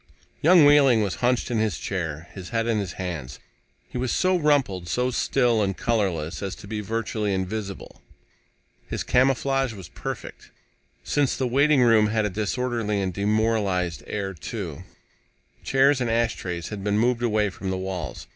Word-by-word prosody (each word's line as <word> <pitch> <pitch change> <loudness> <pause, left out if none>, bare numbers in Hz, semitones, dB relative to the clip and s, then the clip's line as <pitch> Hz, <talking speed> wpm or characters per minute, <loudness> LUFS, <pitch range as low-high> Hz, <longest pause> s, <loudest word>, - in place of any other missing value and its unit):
Young 170 -1 +7
Wehling 140 -6 +6
was 100 - -2
hunched 125 0 +1
in 115 - +1
his 110 -6 0
chair, 85 -4 -4
his 95 -2 -8
head 115 -1 0
in 115 -2 +1
his 95 -3 -4
hand. 80 -9 -5 0.5
He 125 - -5
was 125 -1 -1
so 185 0 +2
rumpled, 140 - +1
so 125 +6 0
still 120 -2 +2
and 95 -2 -1
colorless 95 -9 -1
as 95 -2 -4
to - - -12
be 105 0 -3
virtually 110 0 -2
invisible. 100 +1 -5 0.9
His - - -3
camouflage 135 0 +2
was 95 -7 -10
perfect, - - -7 0.5
since 145 -3 +1
the 130 - 0
waiting 140 +2 +4
room 115 -3 +5
had 110 0 0
a 105 - -1
disorderly 110 +1 -1
and 95 -2 -2
demoralized 100 -4 0
air, 100 -2 -3
too. 80 - -6 0.8
Chairs 135 0 +3
and 120 - 0
ashtrays 110 -7 -1
had 105 -2 -6
been 105 0 +1
moved 120 +2 +2
away 105 -4 +1
from 95 +1 -6
the 95 - -1
walls. 95 -6 -5
110 Hz, 165 wpm, -24 LUFS, 95-125 Hz, 0.9 s, Young